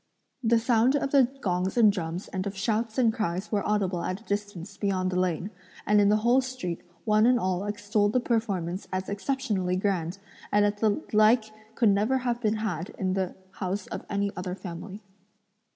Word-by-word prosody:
The 230 0 +4
sound 235 +3 +3
of 275 -1 0
the 270 -4 +5
gongs 185 +2 -1
and 220 -3 +7
drums 175 -1 -4
and 190 +1 -3
of 195 0 -5
shouts 220 +2 -1
and 235 -4 +4
cries 195 -3 -2
were 205 -2 +1
audible 195 -4 0
at 185 +2 -3
a - - -19
distance 205 -2 -4
beyond 190 -2 0
the 180 - 0
lane; 180 +2 -1 0.3
and 210 0 +4
in 200 - +4
the 210 - +5
whole 250 +2 +5
street, 255 -10 -5 0.2
one 215 +1 +4
and 250 -1 +4
all 185 -1 -1
extolled 205 0 0
the 255 - +4
performance 200 -7 -1
as 185 0 -3
exceptionally 200 -4 -1
grand, 185 -2 -1 0.3
and 205 0 +4
that 205 0 0
the 215 -2 +1
like 215 +1 +4 0.2
could 230 - +4
never 210 +6 +2
have 240 -2 -2
been 215 -1 +1
had 190 -6 -3
in 185 -1 0
the 190 -1 -2 0.2
house 190 +1 -3
of - - -6
any 200 0 0
other 180 0 -4
family. 190 +3 -8
205 Hz, 190 wpm, -27 LUFS, 185-225 Hz, 0.3 s, and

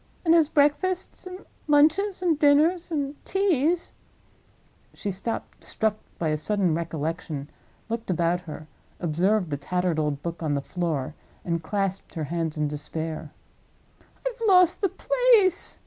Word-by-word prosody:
And 325 - +5
his 325 -3 +5
breakfasts, 350 +7 +1
and 370 +1 -9 0.2
lunches, 320 +7 +3
and 325 -4 +2
dinners, 315 +5 +3
and 285 -2 -3
teas—" 350 -4 +1 1.0
She 205 - -3
stopped, 195 +5 -5
struck 220 -1 -1 0.2
by 165 - -1
a 155 - +1
sudden 190 +1 0
recollection, 160 -2 -4 0.4
looked 230 -1 -4
about 175 0 +1
her, 155 -3 -9 0.3
observed 180 +2 +1
the 145 - -1
tattered 180 +2 -1
old 150 -2 -1
book 170 0 -5
on 150 -3 0
the - - +1
floor, 155 -4 -2 0.3
and 170 -1 -1
clasped 195 +2 -3
her 160 - -2
hands 165 -2 -2
in 150 0 +1
despair. 155 +1 -5 0.9
"I've - - -3
lost 365 -3 +5
the 390 - +2
place!" 475 -5 +3
195 Hz, 140 wpm, -25 LUFS, -, 1.0 s, And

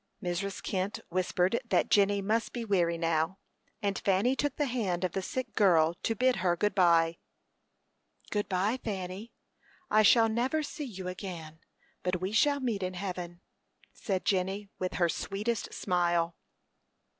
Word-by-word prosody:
Mrs. 185 +2 -3
Kent 190 +2 -2
whispered 185 +3 +1
that 235 - +1
Jenny 200 -1 +4
must 220 +3 0
be 235 -2 -4
weary 175 -5 +2
now, 165 +2 0 0.5
and 200 -1 0
Fanny 200 +7 +2
took 290 +1 -1
the 295 - 0
hand 205 -9 -1
of 180 - 0
the 195 - -2
sick 250 +5 -4
girl, 170 -5 +4
to 225 - 0
bid 255 +3 +2
her 175 -1 +2
good 205 +4 0
by. 170 -3 +4 1.1
"Good 205 -1 -1
by, 200 +6 +1
Fanny. 195 +1 -5 0.6
I 215 - +6
shall 225 +2 +6
never 250 +8 0
see 295 0 -5
you 190 -7 -7
again; 175 -4 -7 0.4
but 180 0 -1
we 185 +2 -2
shall 285 +6 +3
meet 235 -7 -1
in 185 0 -3
heaven," 180 -2 -5 0.5
said 190 -3 -3
Jenny, 195 +1 0
with 185 0 -2
her 175 -1 +3
sweetest 205 +6 -2
smile. 175 -2 0
190 Hz, 155 wpm, -30 LUFS, 180-220 Hz, 1.1 s, I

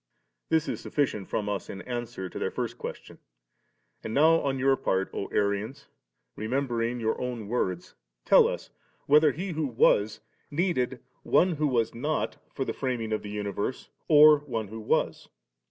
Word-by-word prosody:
s6. - - -50
This 160 0 +2
is - - -3
sufficient 125 -9 -1
from 105 - -2
us 100 -1 -3
in 95 - -7
answer 120 -6 -5
to - - -7
their - - -1
first - - -4
question. - - -8 0.8
And 110 - -4
now 160 +3 +5
on 135 -1 -1
your 135 +1 +3
part, 95 -6 -1
O - - -3
Arians, 105 +7 -1 0.5
remembering 120 0 -1
your 110 -1 -1
own 120 -4 -4
words, 95 -6 -2 0.3
tell - - +7
us - - -5 0.3
whether 150 +1 +5
He 180 +7 -4
who 155 -2 -1
was 105 -3 +3 0.3
needed 145 -7 -1 0.2
one 180 +2 +3
who 150 0 +1
was 115 -4 +1
not 150 +7 -2
for 135 - -3
the - - -2
framing 120 -5 -2
of 110 - -1
the 105 0 -6
universe^ 100 +4 -3 0.2
or 150 -1 +8
one 115 -8 -4
who 110 +2 -7
was? 110 - -1
120 Hz, 170 wpm, -27 LUFS, 105-145 Hz, 0.8 s, or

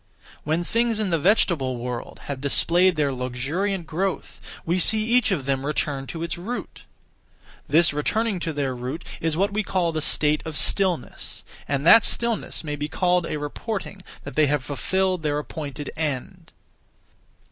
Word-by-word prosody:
When 160 +3 0
things 230 +4 +1
(in 205 -4 -1
the 165 - +2
vegetable 160 - +2
world) 120 0 -6
have 140 -2 -5
displayed 175 +6 +3
their 145 -2 +1
luxuriant 145 +10 -2
growth, 185 +5 -3 0.2
we 175 +3 +1
see 215 +4 +7
each 235 +1 +3
of 160 -10 -1
them 135 -1 0
return 140 -2 -2
to 165 -1 -5
its 170 0 -4
root. 235 +8 -6 0.8
This 160 0 +4
returning 205 +7 0
to 165 - -2
their 140 -3 -2
root 130 +7 -5
is 160 -1 -1
what 200 +2 +1
we 215 - +1
call 185 -4 0
the 155 -1 -2
state 150 0 +2
of 160 -1 -4
stillness; 185 -8 0 0.2
and 140 +1 -1
that 225 +5 +8
stillness 235 -6 0
may 150 -2 -3
be 145 +1 -4
called 180 +1 +1
a - - -3
reporting 195 +7 -5 0.2
that - - -8
they 155 -1 +4
have 145 -2 0
fulfilled 185 +6 -1
their 150 -2 0
appointed 150 -1 -6
end. 150 -5 -4
160 Hz, 165 wpm, -24 LUFS, 145-190 Hz, 0.8 s, that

